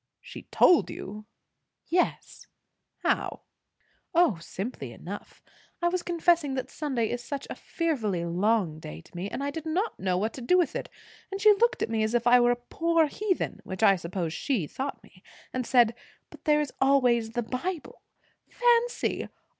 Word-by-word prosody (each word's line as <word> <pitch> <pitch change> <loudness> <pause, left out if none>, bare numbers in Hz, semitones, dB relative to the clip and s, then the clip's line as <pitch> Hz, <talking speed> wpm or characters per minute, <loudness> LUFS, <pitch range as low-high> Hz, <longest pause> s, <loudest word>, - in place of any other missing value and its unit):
"She - - -11
told 355 - +5
you!" 210 +2 -8 0.6
"Yes." 355 +1 -1 0.6
"How?" - - 0 0.7
"O, 335 - +4
simply 180 - -6
enough. 190 - -9 0.4
I 345 - +2
was 365 0 -1
confessing 335 -5 +2
that 260 - -4
Sunday 260 -7 -1
is 245 0 -3
such 280 +2 -5
a - - -4
fearfully 225 - -2
long 180 -2 +1
day 80 - -8
to - - -21
me, 180 +3 -4
and 275 - -4
I 285 - -1
did 320 +1 -6
not 375 +8 -1
know 185 -1 0
what 215 +4 -1
to 260 - -8
do 360 +10 +3
with 350 -3 +1
it; - - -4 0.4
and 390 - -3
she 425 0 +7
looked 470 +3 +2
at - - -2
me 220 -1 +1
as 220 +2 0
if 240 -1 +1
I 245 +1 +7
were 240 0 +4
a 245 - +3
poor 330 +7 +1
heathen 375 +5 -2
which 190 +3 -5
I 195 -2 +7
suppose 170 -2 -3
she 230 - -1
thought 270 - -5
me 185 - -20 0.3
and 255 -2 -2
said, 240 -3 +5 0.4
'But - - -15
there 300 -1 +4
is 295 - -4
always 245 -4 +3
the 240 - -1
Bible!' 305 +9 -4 0.5
Fancy! 485 0 +1
250 Hz, 180 wpm, -28 LUFS, 210-335 Hz, 0.7 s, she